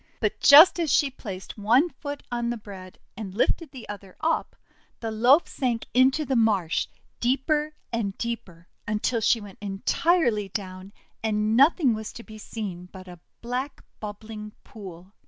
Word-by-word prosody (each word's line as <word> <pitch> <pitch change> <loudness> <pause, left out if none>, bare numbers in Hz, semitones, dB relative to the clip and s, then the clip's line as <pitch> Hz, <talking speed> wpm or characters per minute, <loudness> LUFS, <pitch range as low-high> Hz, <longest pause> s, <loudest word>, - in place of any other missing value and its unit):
But - - -1
just 310 +5 +9
as 325 -5 0
she 280 -1 +3
placed 200 -5 -8
one 245 +11 +4
foot 285 -1 -7
on 240 -1 -1
the 240 - -2
bread, 190 -4 -11 0.2
and 195 -2 -7
lifted 315 +7 0
the 260 -4 -11
other 195 -2 -9
up, 320 +1 -1 0.4
the 225 -1 -4
loaf 245 +9 +4
sank 245 -4 -2
into 265 +4 +4
the 265 - -1
marsh, 205 -8 +2 0.3
deeper 295 +5 0 0.2
and 205 -4 -2
deeper, 200 -8 -5 0.2
until 215 +2 0
she 230 - +3
went 205 -3 -12
en 195 -1 -6
tirely 240 - +2
down, 185 -1 -6 0.3
and 215 0 0
nothing 275 0 +5
was 220 0 -5
to 235 - -10
be 215 -1 -12
seen 185 -5 -6
but 185 -1 -11
a 175 -1 -11 0.2
black 250 +4 -4 0.2
bubbling 210 0 -8
pool. 190 -3 -11
220 Hz, 160 wpm, -25 LUFS, 200-260 Hz, 0.4 s, just